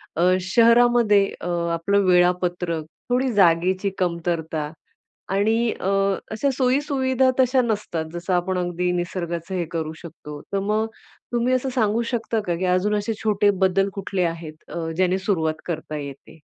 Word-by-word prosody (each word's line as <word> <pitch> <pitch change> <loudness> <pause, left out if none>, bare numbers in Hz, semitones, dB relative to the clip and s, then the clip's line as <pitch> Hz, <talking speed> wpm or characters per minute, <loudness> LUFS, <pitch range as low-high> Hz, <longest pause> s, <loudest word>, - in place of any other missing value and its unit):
अ, 165 - 0 0.2
शहरामध्ये 230 0 +4 0.2
अ, - - -4 0.3
आपलं 200 +5 +1
वेळापत्रक, 180 -2 +2 0.3
थोडी 255 +1 +1
जागेची 185 +1 +3
कमतरता 165 -3 -2 0.6
आणि 220 +4 +2
अ, 190 - -1 0.4
अशा 250 +6 0
सोयी-सुविधा 260 -1 +2
तशा 255 0 +4
नसतात 210 -8 -2
जसं 175 +2 -3
आपण 180 +1 0
अगदी 180 0 -1
निसर्गाचं 175 0 -3
हे 175 -2 -1
करू 160 -2 -3
शकतो. 150 -3 -9
तर 195 - +2
मग 210 +2 0 0.5
तुम्ही 240 +2 +1
असं 255 +1 0
सांगू 220 -1 +2
शकता 230 -1 -1
का 175 - +1
की 180 +2 -2
अजून 185 +3 +2
असे 210 +2 -1
छोटे 205 -1 +3 0.2
बदल 195 +1 +2
कुठले 195 -2 -2
आहेत, 165 -2 -3
अ, 165 -1 -4
ज्याने 185 +1 +2
सुरुवात 160 -5 -1
करता 160 -2 -4
येते? 140 +2 -9
185 Hz, 145 wpm, -23 LUFS, 170-220 Hz, 0.6 s, शहरामध्ये